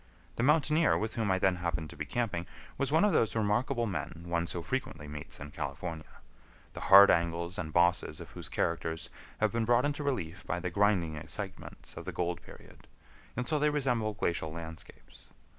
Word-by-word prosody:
The - - -2
mountaineer 155 +4 +4
with 110 +1 -2
whom 110 -3 -1
I 95 - +3
then 95 -1 +2
happened 80 -3 -3
to - - -11
be - - -5
camping 105 -8 -2 0.3
was 140 0 -1
one 160 +6 +5
of 210 - +3
those 115 - +2
remarkable 115 +3 +1
men 85 -4 -4
one 85 0 -1
so 85 -1 -4
frequently 80 - -3
meets 75 -1 -7
in 70 0 -8
California, 80 +2 -5 0.6
the - - -7
hard 100 +1 +10
angles 85 +2 0
and 80 -3 -4
bosses 90 +2 +2
of - - -10
whose - - -8
characters 80 -1 -2 0.3
have 110 -1 +3
been 115 0 0
brought 120 +4 +3
into 145 0 -1
relief 95 - -2
by 90 - -1
the 90 0 -3
grinding 90 -5 +2
excitements 95 +5 -7
of - - -7
the - - -3
gold 90 -1 -2
period, - - -15 0.5
until 125 +5 0
they 150 +1 +3
resemble 125 -7 0
glacial 85 -4 -1
landscapes. 80 0 -10
90 Hz, 185 wpm, -31 LUFS, 85-120 Hz, 0.6 s, hard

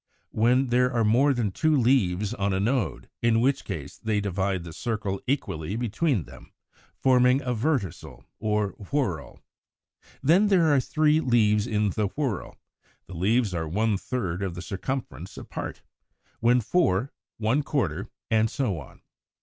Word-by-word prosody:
183) 110 - -2 0.2
when - - -4
there 125 +1 +3
are 120 -3 +1
more 125 +7 +4
than 120 -6 0
two 155 +10 +2
leaves 105 -7 +2
on 100 0 -1
a 95 - 0
node, 115 +2 -1
in 115 -1 +3
which 135 +4 +1
case 75 -9 -6
they 110 -2 0
divide 95 -2 -1
the 85 -2 -9
circle 105 -3 -3
equally 100 - -2
between 120 - 0
them, - - -14 0.5
forming 125 0 +4
a 125 -1 -1
Verticel 115 - -2
or 105 -1 0 0.2
whorl. 100 - -2 0.8
When 180 +9 +5
there 170 -6 +4
are 140 - +5
three 155 +4 +2
leaves 110 -5 +2
in 105 -3 +1
the 105 0 0
whorl, 135 - -2 0.5
the - - -11
leaves 105 +4 +1
are 80 -2 -2
one 105 +6 +1
third 95 -4 -3
of 95 -3 -3
the 90 - -6
circumference 95 - -5
apart; - - -7 0.6
when 120 +1 +4
four, 120 - +1 0.2
one 115 +6 +1
quarter, 100 - -2 0.2
and 110 0 +3
so 105 - -1
on. 70 - -14
110 Hz, 155 wpm, -26 LUFS, 95-130 Hz, 0.8 s, When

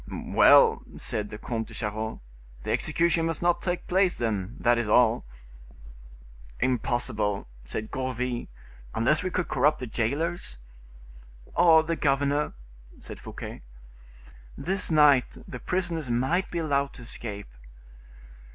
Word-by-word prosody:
"Well!" - - +5 0.2
said 105 -1 -2
the 105 - -7
Comte 115 0 -4
de - - -11
Charost, 110 0 -4 0.4
"the - - -2
execution 165 -1 +2
must 165 0 -2
not 175 0 +2
take 175 -1 -2
place, 185 0 +2
then; 110 -2 -2
that 120 0 +3
is 120 - -1
all." 115 - +3 1.3
"Impossible," 120 - 0 0.2
said 110 - -5
Gourville, 125 -2 -3 0.5
"unless 130 +7 +3
we 185 - -2
could 180 -1 -2
corrupt 145 +4 +2
the 125 - -5
jailers." 125 - -2 1.0
"Or 165 -2 +6
the 165 +1 -1
governor," 145 0 +1 0.5
said - - -9
Fouquet. - - -8 1.0
"This 190 +2 -1
night 150 -5 +4
the 125 - -7
prisoners 170 -3 -2
might 130 +11 +1
be 175 - -4
allowed 140 -4 0
to 125 - -11
escape." 105 -3 -6
130 Hz, 125 wpm, -27 LUFS, 115-165 Hz, 1.3 s, Or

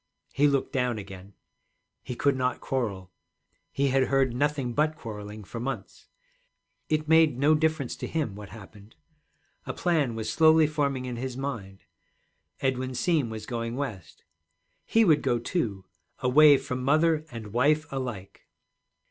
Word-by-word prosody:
He 145 +1 +4
looked 140 0 0
down 125 -4 0
again; 95 -1 -10 0.7
he 125 - -6
could 140 +2 +2
not 130 0 -1
quarrel, 100 -8 -3 0.6
he 140 0 +1
had 135 0 +3
heard 135 -2 +1
nothing 140 -2 0
but 155 +4 +1
quarreling 105 -4 -8
for 115 +4 -7
months. 135 +3 -6 0.8
It 155 0 0
made 160 -4 +5
no 145 +4 +4
difference 155 -4 0
to - - -5
him 150 -10 -2
what 100 -1 -10
happened. 105 0 -14 0.7
A - - -3
plan 155 -9 +1
was 110 -1 -4
slowly 160 -1 +6
forming 140 -4 -1
in 125 -1 -5
his 130 +1 -5
mind. 115 -9 -6 0.8
Edwin 130 -1 -1
Seem 155 -5 +1
was 110 -1 -6
going 115 -1 -4
West; 110 - -6 0.6
he 225 0 +3
would 155 -5 +4
go 125 -3 +1
too, 115 - -3 0.3
away 145 +3 +6
from 125 -1 -4
mother 155 +3 +3
and 110 -3 -9
wife 150 +5 +3
alike. 120 -8 -6
130 Hz, 150 wpm, -27 LUFS, 115-150 Hz, 0.8 s, slowly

